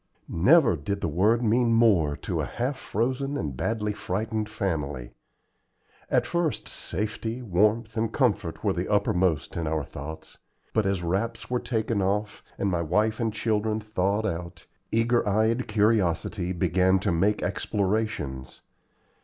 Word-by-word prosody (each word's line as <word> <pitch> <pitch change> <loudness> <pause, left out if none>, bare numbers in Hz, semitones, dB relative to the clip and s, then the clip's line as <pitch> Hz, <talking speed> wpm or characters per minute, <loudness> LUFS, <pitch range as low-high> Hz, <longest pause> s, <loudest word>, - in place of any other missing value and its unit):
Never 125 - +5
did 100 +7 -3
the - - 0
word 105 +10 +2
mean 115 +1 +3
more 100 -11 +4
to - - -1
a - - -2
half 125 +4 -2
frozen 130 +6 -2
and 70 -4 -3
badly 105 - -1
frightened 110 +3 -2
family. 75 - -3 1.0
At - - +2
first 170 -4 -1
safety, 110 +5 -3
warmth, 110 +3 +1
and 110 0 0
comfort 105 - 0
were - - +2
the - - -2
uppermost 90 -4 +1
in 80 -2 -2
our 80 -1 0
thoughts, 75 +3 -9 0.3
but 110 -3 +2
as 95 -3 0
wraps 110 +9 -2
were 125 - +2
taken 110 -3 -1
off, 100 +2 -1
and 100 - 0
my 85 -2 0
wife 105 +7 +1
and 115 -2 0
children 110 0 0
thawed 105 0 -1
out, 85 -3 -4 0.3
eager 115 +1 +3
eyed 110 +4 +1
curiosity 105 -3 +1
began 90 +1 +2
to 100 - 0
make 100 +5 +1
explorations. 95 -11 -2
105 Hz, 145 wpm, -26 LUFS, 90-115 Hz, 1.0 s, Never